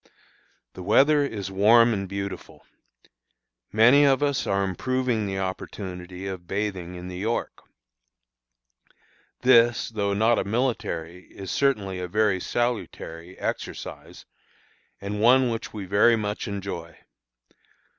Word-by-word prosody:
The - - -9
weather 145 +10 +4
is 100 -8 -4
warm 115 +4 +5
and 100 -2 -3
beautiful. 100 0 -6 1.1
Many 120 +7 +6
of 140 0 +3
us 140 -2 0
are 100 0 +1
improving 115 +3 -1
the 95 0 -3
opportunity 95 -1 -6
of 95 -3 -6
bathing 95 -3 -3
in 90 0 -8
the 90 0 -7
York. 115 +4 -3 1.8
This, 120 -2 +4
though 100 -3 -1
not 110 +3 +3
a - - 0
military, 100 -7 -2
is 95 -2 -7
certainly 105 -9 0
a 90 - -4
very 105 0 +1
salutary, 95 -7 -3
exercise, - - -6 0.7
and 105 +1 -4
one 125 +2 +5
which 115 - -5
we 105 -3 -6
very 100 +5 +4
much 105 0 -3
enjoy. 95 -5 -6
100 Hz, 120 wpm, -25 LUFS, 95-120 Hz, 1.8 s, Many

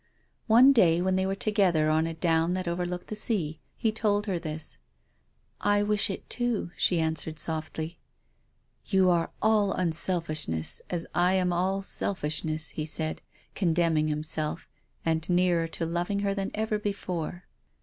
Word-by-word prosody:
One 245 +5 +7
day, 175 -9 +4
when 185 +1 +1
they 190 0 +1
were 195 - -1
together 190 -7 +2
on 160 +1 +2
a 165 - -5
down 165 +1 +1
that 185 -1 -3
overlooked 180 +1 -3
the 215 - -6
sea, 175 -8 -1 0.2
he 220 - +1
told 210 -1 0
her 190 -5 -1
this. 155 -1 -6 0.4
" - - -43
I 205 0 +2
wish 210 0 +2
it 195 - -6
too," 240 -7 -1
she 175 - +2
answered 160 -1 -1
softly. 160 +1 -2 0.4
" - - -44
You 190 -2 +4
are 170 -1 +1
all 210 -2 +3
unselfishness, 160 - 0
as 170 -2 -2
I 180 +1 +3
am 180 -1 +1
all 190 +3 0
selfish 155 -6 -1
ness," 155 0 -1
he 155 - -4
said, 155 0 -1 0.3
condemning 165 -4 +1
himself, 155 +1 -2 0.4
and 160 +1 0
nearer 175 -2 +2
to 165 0 -3
loving 175 +4 -1
her 200 -1 0
than 195 -1 -2
ever 215 0 -1
before. 180 -4 -4
175 Hz, 160 wpm, -28 LUFS, 160-195 Hz, 0.4 s, One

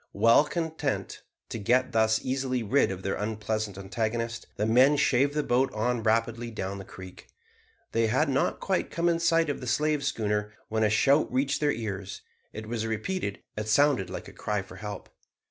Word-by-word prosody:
Well 115 +7 +5
content 160 -4 -3 0.3
to 115 - -4
get 125 +5 +2
thus 110 0 +2
easily 130 -2 -1
rid 130 +7 +3
of 95 -1 -5
their 95 - -1
unpleasant 110 -1 -3
antagonist, 115 +4 -3
the 105 - 0
men 130 +6 +5
shaved 140 +2 +2
the 150 - +1
boat 130 +1 +2
on 120 +2 0
rapidly 115 +1 0
down 100 -3 -4
the - - -7
creek. 95 -1 -12 0.6
They 115 0 +2
had 130 +8 +2
not 135 -1 0
quite 190 -1 -1
come 170 +1 0
in 170 -1 +2
sight 165 -1 +3
of 145 - -3
the 125 - -6
slave 150 +3 +1
schooner 105 -6 -1 0.2
when 110 0 +1
a 105 - +4
shout 140 +8 +3
reached 135 +2 +1
their 145 -1 +3
ears. 100 -5 -5 0.3
It 110 +1 -7
was 115 0 -3
repeated. 110 - -3
It 105 0 -4
sounded 125 -4 +3
like - - -6
a - - -11
cry 105 -2 -2
for - - -12
help. 105 -1 -7
115 Hz, 185 wpm, -28 LUFS, 105-140 Hz, 0.6 s, Well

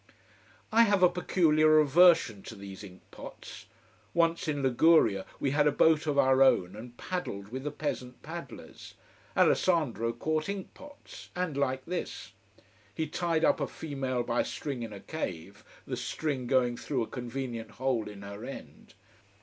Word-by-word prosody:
I 225 +1 +5
have 200 -3 +2
a 180 - +8
peculiar 155 -3 +3
aversion 155 - +5
to 115 - -9
these 100 -1 -10
ink 95 -2 -13
pots. - - -11 0.5
Once 165 0 +2
in 145 -2 -1
Liguria 130 - +4
we 135 - 0
had 145 +1 +3
a - - +4
boat 160 +1 +3
of 145 -1 0
our 130 -1 +4
own 95 -8 +4
and 120 +3 -10
paddled 105 - -5
with 130 +3 -6
the - - 0
peasant 140 -4 -5
paddlers. 170 +2 -9 0.4
Alessandro 130 - +2
caught 155 +8 -2
ink 200 -2 -5
pots: 290 -1 -13
and 180 -5 -2
like 130 -2 -1
this. 180 +1 -5 0.6
He 160 - -1
tied 165 +1 0
up - - +3
a - - -1
female 135 -5 -3
by 120 0 0
a - - -3
string 135 -5 -5
in 115 -2 -5
a 100 - -8
cave 100 - -6 0.2
the - - -3
string 140 -6 -3
going 125 -2 +2
through 130 -2 -2
a - - -6
convenient 120 -2 -5
hole 120 -2 -2
in 100 -1 -10
her 100 +2 -8
end. 135 +2 -10
135 Hz, 165 wpm, -29 LUFS, 115-160 Hz, 0.6 s, a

